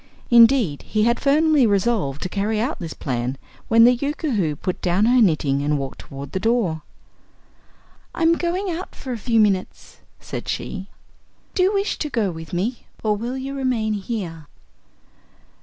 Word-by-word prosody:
Indeed, 230 - +5
he 215 -1 -1
had 235 +1 +2
firmly 295 -2 +4
resolved 195 - 0
to - - -1
carry 210 +3 -1
out 250 +8 -2
this 165 -3 -6
plan 125 -1 -3 0.3
when 230 0 +6
the 245 +1 +7
Yookoohoo 245 - -1
put 180 +5 -4
down 185 +4 +2
her 245 +1 +4
knitting 150 -8 +2
and 145 +1 +1
walked 135 -1 -5
toward 140 0 -9
the 190 - -2
door. 210 -7 0 1.3
"I'm 330 0 +3
going 355 +4 -1
out 345 +3 -6
for 265 - -7
a 240 - -2
few 230 +1 +1
minutes," 195 -3 0 0.2
said - - -7
she; 190 +1 -4 0.6
"do 370 - +1
you 375 +2 +4
wish 395 +1 -1
to 300 - -2
go 220 -8 0
with 160 -2 -9
me, 210 +8 -3 0.2
or 215 -1 +2
will 240 +5 -4
you 270 +1 -5
remain 250 -5 0
here?" 190 -7 -5
220 Hz, 165 wpm, -22 LUFS, 175-260 Hz, 1.3 s, the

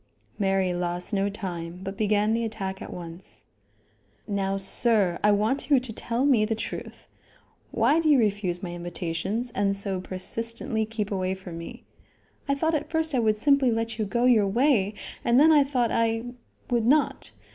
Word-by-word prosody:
Mary 195 -2 +1
lost 175 +3 -3
no 200 0 +1
time, 180 -4 -6
but 195 +1 -5
began 210 +1 +1
the 230 +1 0
attack 195 -4 -4
at - - -7
once. 170 +1 -10 0.8
"Now, 195 -1 -1
sir, 195 -2 +2
I 210 - +5
want 215 +8 +1
you 280 -3 +5
to 245 -3 -8
tell 235 +4 -1
me 255 -7 +4
the 220 +1 0
truth; 220 - -7 0.6
why 240 +8 +2
do 320 -1 +1
you 290 - +6
refuse 200 -6 0
my 175 - -4
invitations 175 +7 -3
and 200 -2 0
so 195 -2 -3
persistently 220 +4 -3
keep 215 -2 -4
away 190 -1 -1
from 180 -3 -9
me? 170 - -9 0.7
I 280 - +3
thought 320 +3 0
at 305 - -2
first 320 -1 0
I 255 - +2
would 215 -2 +2
simply 280 +1 +3
let 230 0 -2
you 215 - +1
go 235 +5 0
your 225 -5 +5
way, 215 -2 +2 0.3
and 240 +2 +4
then 315 +2 +7
I 295 -2 +6
thought 255 -4 0
I 225 0 +1 0.5
would 235 -2 +1
not. 295 +3 +2
215 Hz, 180 wpm, -26 LUFS, 190-240 Hz, 0.8 s, then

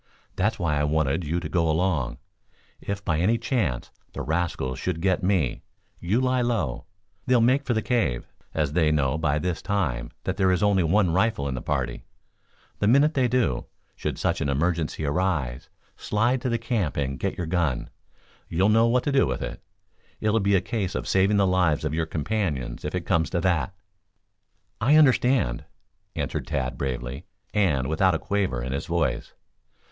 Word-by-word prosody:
That's 105 +4 +1
why 75 -5 0
I - - +1
wanted 75 +2 +1
you 80 +4 -1
to 85 - -5
go 85 -2 +1
along. 80 -5 0 0.6
If, 100 0 -4
by 80 -3 +1
any 110 +7 +3
chance, 115 - -1 0.2
the - - -4
rascals 80 -6 -2
should 90 -3 -2
get 95 +1 +1
me, 90 -9 +1 0.4
you 95 +7 +1
lie 130 -1 +2
low. 105 - -1 0.4
They'll 125 -1 +4
make 130 +5 +3
for 120 - +1
the 110 - 0
cave, 85 - 0 0.3
as 75 -2 -1
they 80 -2 +3
know, 75 0 +1
by 75 -2 +1
this 90 +2 -2
time, 80 - -1
that 95 0 -2
there 95 -2 +3
is 90 +3 +1
only 100 -2 +3
one 90 +1 +2
rifle 95 -6 +1
in 70 - -2
the 60 - -4
party. 65 -4 -2 0.8
The 105 - +1
minute 140 +7 +5
they 130 -4 +2
do, 120 - 0 0.3
should - - -3
such - - 0
an 70 - 0
emergency 80 +2 0
arise, 75 -6 -1 0.3
slide 120 +4 0
for 125 - -1
the 115 - +1
camp 115 - -1
and 70 -2 -2
get - - -2
your 90 - -2
gun. 80 -6 -1 0.6
You'll 95 +5 +2
know 115 +2 +5
what 125 +1 +2
to 145 - 0
do 135 -1 +3
with - - -2
it. - - -6 0.6
It'll 110 +1 +2
be 100 0 +2
a 95 - +3
case 100 -6 -3
of - - -3
saving 95 +2 +3
the 100 - +4
lives 90 -5 +2
of 75 - -1
your 80 0 -1
companions 75 - -2
if - - -3
it - - -3
comes 80 -1 +1
to 85 - -1
that." 90 +1 0 1.1
"I 135 +7 +5
understand," 130 - +3 0.5
answered - - -3
Tad 65 -1 -2
bravely; 65 +3 -4 0.3
and 85 -11 +2
without 90 +3 +2
a - - +2
quaver 95 -11 -1
in 65 - -4
his 70 - -3
voice. - - -1
90 Hz, 185 wpm, -25 LUFS, 75-105 Hz, 1.1 s, minute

